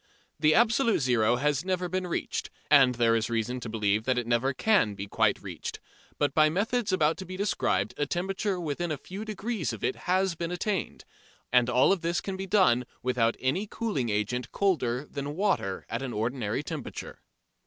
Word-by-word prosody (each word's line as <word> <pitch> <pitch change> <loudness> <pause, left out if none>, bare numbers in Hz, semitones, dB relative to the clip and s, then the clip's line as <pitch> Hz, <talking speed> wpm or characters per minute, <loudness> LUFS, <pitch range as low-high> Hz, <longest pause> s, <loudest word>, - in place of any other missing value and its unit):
The 155 0 +4
absolute 235 0 +4
zero 120 -4 +2
has 145 +3 0
never 185 -1 -1
been 185 +1 -2
reached, 175 - -3 0.2
and 135 -4 +6
there 115 -1 +3
is 115 +1 0
reason 115 +2 -1
to 120 - -6
believe 105 -1 0
that 130 -1 +1
it 120 - 0
never 120 +3 +1
can 130 - +2
be 100 0 -5
quite 100 - +1
reached, - - -6 0.4
but 145 -2 +1
by 155 0 +5
methods 210 +5 0
about 160 -3 +2
to 190 - -7
be 185 +1 -6
described 110 - 0
a 145 - 0
temperature 190 +3 -1
within 170 +1 -2
a 150 - -2
few 190 +8 -7
degrees 215 - -3
of 115 - -8
it 130 - 0
has 190 0 +2
been 170 0 -4
attained. 190 +2 -3 0.5
And 125 -1 +5
all 125 +6 +4
of 195 -3 +1
this 170 0 0
can 195 - -4
be 190 +1 -5
done 175 - +3 0.2
without 120 -2 +1
any 160 +11 0
cooling 205 - -2
agent 110 +4 -2
colder 140 -10 0
than 145 0 -5
water 180 - 0
at 115 +2 -3
an 130 -3 -4
ordinary 115 +2 -2
temperature. 150 -2 -7
145 Hz, 190 wpm, -28 LUFS, 120-185 Hz, 0.5 s, and